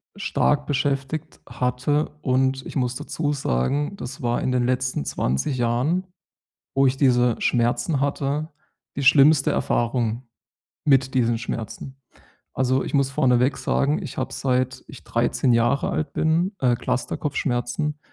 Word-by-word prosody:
stark 145 Hz, -7 st, +1 dB
beschäftigt 140 Hz, +2 st, -2 dB
hatte. 125 Hz, +4 st, -1 dB
Und 130 Hz, 0 st, +1 dB
ich -, -, -8 dB
muss 125 Hz, -1 st, 0 dB
dazu 150 Hz, +1 st, -2 dB
sagen, 140 Hz, -, -1 dB
das 130 Hz, +2 st, -7 dB
war 120 Hz, 0 st, 0 dB
in 130 Hz, -, 0 dB
den 125 Hz, -1 st, +2 dB
letzten 130 Hz, -, -1 dB
20 65 Hz, -, -1 dB
Jahren, 130 Hz, +11 st, 0 dB, 0.7 s
wo 135 Hz, -, +4 dB
ich 130 Hz, +1 st, 0 dB
diese 125 Hz, -3 st, +3 dB
Schmerzen 120 Hz, +5 st, +1 dB
hatte, 145 Hz, +2 st, -1 dB, 0.5 s
die -, -, -2 dB
schlimmste 140 Hz, +1 st, +6 dB
Erfahrung 120 Hz, 0 st, 0 dB, 0.6 s
mit 135 Hz, -2 st, +3 dB
diesen 120 Hz, -2 st, +2 dB
Schmerzen. 120 Hz, +3 st, -6 dB, 0.6 s
Also, 130 Hz, 0 st, +1 dB
ich -, -, -6 dB
muss 140 Hz, -1 st, +2 dB
vorneweg 125 Hz, 0 st, +2 dB
sagen, 145 Hz, +2 st, 0 dB
ich 155 Hz, -, -8 dB
habe, -, -, -2 dB
seit 130 Hz, -1 st, -1 dB
ich -, -, -12 dB
13 130 Hz, -, +1 dB
Jahre 120 Hz, +4 st, +2 dB
alt 155 Hz, -2 st, -2 dB
bin, 170 Hz, +5 st, +1 dB
äh, 125 Hz, -2 st, +3 dB
Clusterkopfschmerzen. 130 Hz, +3 st, -2 dB
130 Hz, 135 wpm, -23 LUFS, 125-145 Hz, 0.7 s, schlimmste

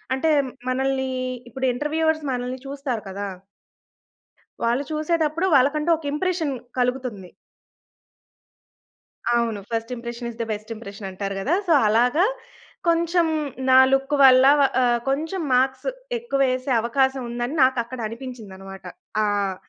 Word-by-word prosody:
అంటే 320 Hz, +4 st, 0 dB, 0.4 s
మనల్ని 265 Hz, +1 st, 0 dB, 0.4 s
ఇప్పుడు 265 Hz, +3 st, -3 dB
ఇంటర్వ్యూవర్స్ 315 Hz, +3 st, 0 dB
మనల్ని 250 Hz, +1 st, -3 dB
చూస్తారు 275 Hz, -4 st, -4 dB
కదా. 200 Hz, +1 st, -4 dB, 1.4 s
వాళ్ళు 240 Hz, +4 st, +1 dB
చూసేతప్పుడు 315 Hz, +2 st, 0 dB
వాళ్ళకంటూ 295 Hz, +4 st, +3 dB
ఒక 315 Hz, -, -12 dB
ఇంప్రెషన్ 330 Hz, -3 st, -1 dB, 0.2 s
కలుగుతుంది. 250 Hz, -7 st, -2 dB, 2.0 s
అవును. 235 Hz, -3 st, +1 dB
First 230 Hz, 0 st, -2 dB
impression 235 Hz, 0 st, -7 dB
is -, -, -13 dB
the 230 Hz, -, -3 dB
best 210 Hz, +1 st, -7 dB
impression 200 Hz, -2 st, -9 dB
అంటారు 195 Hz, +1 st, -4 dB
కదా! 280 Hz, -, 0 dB
So, 335 Hz, -, +4 dB
అలాగా 245 Hz, -, +3 dB, 0.6 s
కొంచెం, 335 Hz, 0 st, +2 dB, 0.4 s
నా 260 Hz, -, +7 dB
లుక్ 270 Hz, +2 st, +1 dB
వల్ల 260 Hz, -1 st, +8 dB, 0.4 s
ఆహ్, 240 Hz, -1 st, +3 dB
కొంచెం 320 Hz, +7 st, -1 dB
మార్క్స్ 260 Hz, -, +1 dB, 0.3 s
ఎక్కువేసే 275 Hz, -, 0 dB
అవకాశం 265 Hz, +3 st, +1 dB
ఉందని, 240 Hz, +4 st, -3 dB
నాకు 260 Hz, -1 st, +3 dB
అక్కడ 245 Hz, +2 st, -9 dB
అనిపించిందనమాట. 210 Hz, -6 st, -9 dB, 0.4 s
ఆహ్, 200 Hz, -2 st, 0 dB
255 Hz, 115 wpm, -23 LUFS, 230-295 Hz, 2.0 s, వల్ల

